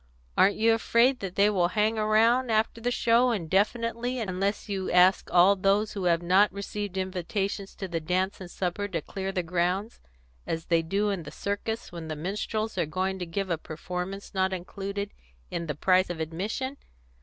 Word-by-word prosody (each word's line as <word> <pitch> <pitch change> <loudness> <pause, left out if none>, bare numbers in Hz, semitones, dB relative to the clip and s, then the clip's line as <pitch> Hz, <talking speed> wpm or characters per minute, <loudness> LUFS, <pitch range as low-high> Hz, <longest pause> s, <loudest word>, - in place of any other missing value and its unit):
Aren't 200 +2 +5
you 225 +1 +4
afraid 235 +3 +3
that 190 -2 -5
they 200 +1 +5
will 185 -4 +2
hang 215 +4 +1
around, 225 +4 +3
after 220 +1 +1
the 245 - 0
show, 240 +1 +3
indefinitely, 230 +5 0
unless 200 -1 -2
you 195 -2 -2
ask 180 +2 +4
all 180 +3 +6
those 200 +3 +2
who 195 -3 -4
have 170 -1 +2
not 190 +4 +4
received 200 -1 -5
invitations 195 +2 -3
to 195 - -5
the 170 -2 -2
dance 185 +4 -1
and 180 - -8
supper 185 +3 -2
to 170 -5 -3
clear 195 0 -4
the 185 -2 -1
grounds, 180 +5 -1 0.5
as 165 0 -3
they 165 -1 +3
do 200 +5 0
in 195 -3 -2
the 150 - -8
circus 215 +3 -4
when 170 -2 -7
the 155 - -4
minstrels 205 +5 -3
are 170 - +1
going 190 +4 -2
to 180 - -4
give 190 +2 -3
a 165 - 0
performance 180 +5 -6
not 190 0 +1
included 200 +2 -4 0.4
in 170 -1 -3
the 150 - -2
price 185 +3 +3
of 175 -2 -4
admission? 205 - -3
195 Hz, 185 wpm, -27 LUFS, 180-215 Hz, 0.5 s, all